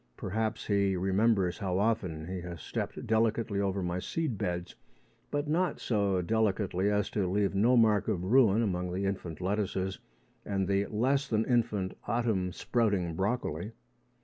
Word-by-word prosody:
Perhaps 110 Hz, +3 st, -2 dB
he 100 Hz, -2 st, +2 dB
remembers 95 Hz, +1 st, +2 dB
how 95 Hz, -3 st, -1 dB
often 95 Hz, -7 st, 0 dB
he 90 Hz, 0 st, -4 dB
has 85 Hz, -1 st, -7 dB
stepped -, -, -4 dB
delicately 110 Hz, -2 st, +1 dB
over 100 Hz, -1 st, 0 dB
my 90 Hz, +1 st, -1 dB
seed 155 Hz, -, -2 dB
beds, 90 Hz, -2 st, -3 dB, 0.6 s
but 145 Hz, +1 st, -2 dB
not 175 Hz, +4 st, 0 dB
so 100 Hz, -5 st, +1 dB
delicately 100 Hz, -2 st, +1 dB
as 105 Hz, 0 st, +1 dB
to 100 Hz, -4 st, 0 dB
leave 100 Hz, +2 st, +1 dB
no 115 Hz, +6 st, +4 dB
mark 110 Hz, -3 st, +4 dB
of 95 Hz, -6 st, -1 dB
ruin 115 Hz, +1 st, +4 dB
among 90 Hz, -3 st, -1 dB
the 95 Hz, +2 st, -2 dB
infant 90 Hz, -5 st, -3 dB
lettuces 95 Hz, 0 st, -1 dB, 0.4 s
and 95 Hz, -2 st, -1 dB
the 100 Hz, 0 st, +1 dB
less 135 Hz, +6 st, +1 dB
than 110 Hz, -3 st, +1 dB
infant 110 Hz, -6 st, 0 dB
autumn 105 Hz, -5 st, 0 dB
sprouting 100 Hz, -6 st, 0 dB
broccoli. 100 Hz, -1 st, -2 dB
100 Hz, 150 wpm, -30 LUFS, 95-110 Hz, 0.6 s, no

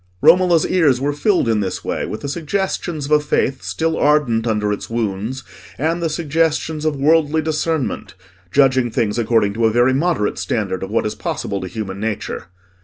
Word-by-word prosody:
Romola's 175 Hz, -, +5 dB
ears 155 Hz, -9 st, +3 dB
were 145 Hz, +2 st, 0 dB
filled 175 Hz, -, +1 dB
in 110 Hz, -2 st, +2 dB
this 95 Hz, -3 st, -3 dB
way -, -, -2 dB
with 105 Hz, -, -6 dB
the 140 Hz, -, -4 dB
suggestions 170 Hz, 0 st, -2 dB
of 145 Hz, -, -7 dB
a 150 Hz, -, +6 dB
faith 135 Hz, -2 st, 0 dB
still 160 Hz, 0 st, -1 dB
ardent 135 Hz, -6 st, +2 dB
under 105 Hz, -2 st, 0 dB
its 105 Hz, -, -6 dB
wounds, 115 Hz, +3 st, -3 dB, 0.3 s
and 165 Hz, +4 st, -1 dB
the 165 Hz, -, 0 dB
suggestions 160 Hz, 0 st, -1 dB
of 155 Hz, -2 st, +1 dB
worldly 155 Hz, +2 st, +3 dB
discernment, 155 Hz, -9 st, -2 dB, 0.4 s
judging 130 Hz, -2 st, +3 dB
things 115 Hz, -1 st, -1 dB
according 110 Hz, -3 st, +2 dB
to 115 Hz, +1 st, +2 dB
a -, -, +1 dB
very 120 Hz, +3 st, +3 dB
moderate 140 Hz, -, 0 dB
standard 95 Hz, 0 st, -2 dB
of 95 Hz, -, -5 dB
what 110 Hz, -, 0 dB
is 105 Hz, -, -1 dB
possible 100 Hz, -, -4 dB
to 95 Hz, -, -5 dB
human 95 Hz, 0 st, -5 dB
nature. 110 Hz, 0 st, -4 dB
135 Hz, 180 wpm, -19 LUFS, 110-160 Hz, 0.4 s, a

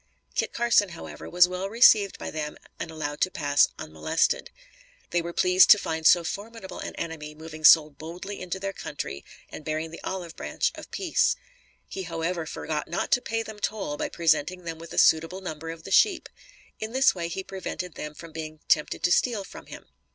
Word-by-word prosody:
Kit -, -, -1 dB
Carson, 235 Hz, -4 st, +3 dB
however, 170 Hz, -, -9 dB
was 180 Hz, 0 st, +6 dB
well 185 Hz, +2 st, -4 dB
received 215 Hz, -3 st, +5 dB
by -, -, -6 dB
them 150 Hz, -1 st, -4 dB, 0.2 s
and -, -, -4 dB
allowed 150 Hz, -2 st, -5 dB
to 185 Hz, -, +3 dB
pass 145 Hz, -4 st, +3 dB
unmolested. 155 Hz, +1 st, 0 dB, 0.6 s
They 175 Hz, -, +2 dB
were 170 Hz, +1 st, -5 dB
pleased 180 Hz, +2 st, +5 dB
to 210 Hz, -, +10 dB
find 160 Hz, -4 st, 0 dB
so 175 Hz, -1 st, +6 dB
formidable 200 Hz, +4 st, -6 dB
an -, -, -6 dB
enemy 150 Hz, -2 st, -6 dB
moving 155 Hz, 0 st, -10 dB, 0.4 s
boldly 175 Hz, +5 st, -7 dB
into 185 Hz, 0 st, -4 dB
their 195 Hz, 0 st, -3 dB
country 70 Hz, -, -6 dB, 0.3 s
and -, -, -8 dB
bearing 155 Hz, +1 st, -3 dB
the 165 Hz, -, -10 dB
olive 180 Hz, -3 st, -5 dB
branch -, -, -1 dB
of -, -, -11 dB
peace. 360 Hz, -5 st, +1 dB, 0.5 s
He 190 Hz, -, -6 dB
however 165 Hz, -1 st, -3 dB
forgot 155 Hz, -1 st, -4 dB
not 170 Hz, -, -2 dB
to 245 Hz, -, +4 dB
pay 225 Hz, -1 st, -2 dB
them 220 Hz, -2 st, -9 dB
toll 205 Hz, -9 st, -2 dB
by -, -, -3 dB
presenting 170 Hz, +2 st, +1 dB
them 165 Hz, -1 st, -6 dB
with 165 Hz, 0 st, -10 dB
a -, -, -7 dB
suitable 165 Hz, +4 st, +4 dB
number 165 Hz, -3 st, -6 dB
of 165 Hz, 0 st, -8 dB
the -, -, -9 dB
sheep. 390 Hz, -5 st, +4 dB, 0.5 s
In 220 Hz, +1 st, -5 dB
this 265 Hz, +1 st, +5 dB
way 170 Hz, -2 st, -3 dB
he 180 Hz, +3 st, -4 dB
prevented 185 Hz, -2 st, -6 dB
them 150 Hz, 0 st, -7 dB
from 165 Hz, +1 st, -11 dB
being 155 Hz, -1 st, -7 dB
tempted 150 Hz, -, +2 dB
to 175 Hz, -, +3 dB
steal 225 Hz, 0 st, +2 dB
from -, -, -12 dB
him. -, -, -10 dB
170 Hz, 195 wpm, -26 LUFS, 160-195 Hz, 0.6 s, to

